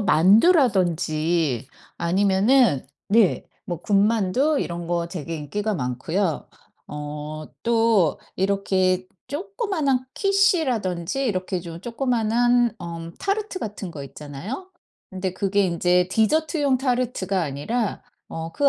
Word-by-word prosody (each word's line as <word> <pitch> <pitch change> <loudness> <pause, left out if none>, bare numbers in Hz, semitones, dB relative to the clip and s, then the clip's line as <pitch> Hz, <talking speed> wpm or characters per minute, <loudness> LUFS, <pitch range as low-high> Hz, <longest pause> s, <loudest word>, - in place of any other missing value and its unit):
만두라든지 175 - +3 0.3
아니면은 195 - +3 0.2
네. 210 -2 +3 0.2
뭐 175 -3 -4
군만두 215 +8 +2
이런 170 -1 -4
거 170 -1 0
되게 165 -1 -5
인기가 205 +9 -3
많고요. 155 +6 -2 0.4
어 150 +1 -6 0.2
또 225 -8 +3 0.2
이렇게 190 -1 +1 0.2
조그만한 315 - -1
키슈라든지 275 - +1
이렇게 185 -3 -1
좀 170 -1 -8
조그만한 240 -1 +1
어 170 -1 -6
타르트 400 -1 -2
같은 205 -4 -5
거 145 - -7
있잖아요. 150 - -7 0.4
근데 185 -1 -3
그게 200 0 +1
인제 180 +1 +2
디저트용 285 - +2
타르트가 245 -7 0
아니라 180 - -2 0.3
어 165 0 -5
그 285 -1 +3
195 Hz, 245 characters per minute, -23 LUFS, 170-245 Hz, 0.4 s, 만두라든지